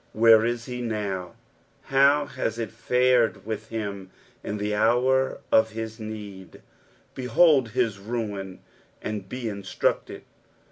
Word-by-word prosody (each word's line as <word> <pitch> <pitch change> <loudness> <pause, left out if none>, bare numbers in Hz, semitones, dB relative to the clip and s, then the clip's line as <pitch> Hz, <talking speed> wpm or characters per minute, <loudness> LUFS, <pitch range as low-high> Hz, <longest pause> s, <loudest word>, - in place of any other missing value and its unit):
Where 110 0 +6
is 120 0 -1
he 125 -1 -5
now 100 -6 -3 0.5
t - - -13
How 140 +2 +5
hu 130 - -10 0.2
it 115 - -3
fared 125 0 +2
with 110 0 -5
him 100 -4 -5 0.3
in 105 - -4
the 105 0 -2
hour 125 +5 +2
of 110 0 +4
his 110 0 -6
need 105 -3 -8
t - - -14 0.5
Bebold 130 -1 +3
bis 115 -6 0
ruin, 100 -3 -5 0.4
snd 105 -3 -5
be 125 +2 -6
inatructed. 100 -4 -2
110 Hz, 135 wpm, -25 LUFS, 105-125 Hz, 0.5 s, Where